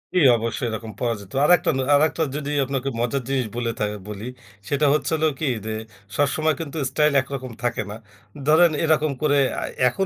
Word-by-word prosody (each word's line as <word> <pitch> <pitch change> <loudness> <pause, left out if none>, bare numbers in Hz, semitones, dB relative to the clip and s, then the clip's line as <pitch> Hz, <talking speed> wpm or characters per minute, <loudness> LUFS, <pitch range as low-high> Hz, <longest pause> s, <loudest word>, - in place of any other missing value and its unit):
জি, - - +5 0.2
অবশ্যই 115 +2 -2
এরকম 110 0 -5
পাওয়া 120 -2 0
যেত। 100 -1 -13
আরেকটা 175 +2 +4
না 135 - 0
আরেকটা 155 +3 +2
যদি 145 -1 -3
আপনাকে 135 0 -2
মজার 125 +3 -1
জিনিস 130 -3 0
বলে 120 -1 -1
থা - - +1 0.2
বলি, 105 +2 -6 0.4
সেটা 145 +1 +1
হচ্ছে 145 -1 0
হলো 160 0 +2
কী 155 - -1 0.2
যে, 110 - -3 0.4
সবসময় 155 +2 +1
কিন্তু 160 -1 -5
স্টাইল 150 +2 +2
একরকম 130 -1 -6
থাকে 120 - 0
না। 105 - -6 0.5
ধরেন, 160 +2 +6
এরকম 155 -1 +2
করে 145 -2 +3 0.2
আ - - -2 0.2
এখন 160 +11 0
140 Hz, 185 wpm, -23 LUFS, 120-155 Hz, 0.5 s, ধরেন